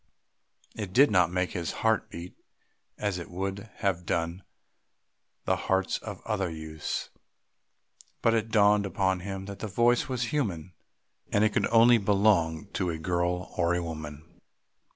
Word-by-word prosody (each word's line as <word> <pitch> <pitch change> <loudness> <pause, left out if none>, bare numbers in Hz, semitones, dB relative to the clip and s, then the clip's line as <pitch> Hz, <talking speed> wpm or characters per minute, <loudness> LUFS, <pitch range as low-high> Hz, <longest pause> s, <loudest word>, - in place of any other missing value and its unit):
It 100 -4 -5
did 140 +1 +6
not 90 -4 +4
make 90 0 0
his 85 -2 -3
heart 110 -1 +2
beat 85 +2 -8 0.6
as 100 -4 -2
it 85 - -8
would 95 +3 -4
have 95 -4 0
done 85 +2 -2 1.0
the - - +2
hearts 95 0 0
of - - -8
other 100 -5 -1
youths, 80 -1 -5 1.1
but 115 - +4
it 115 -1 0
dawned 105 -1 +4
upon 95 0 0
him 95 +1 -5
that 100 0 -8
the 110 - -4
voice 120 +6 +2
was 125 +1 -2
human, 95 - -2 0.6
and 105 - +3
that 110 - +3
it - - -14
could - - +2
only 115 +1 +6
belong 100 -5 +2
to 95 -3 -1
a 80 - -2
girl 90 +2 -1
or 85 -1 +2
a 90 - -1
woman. 80 -2 -7
95 Hz, 155 wpm, -28 LUFS, 85-105 Hz, 1.1 s, did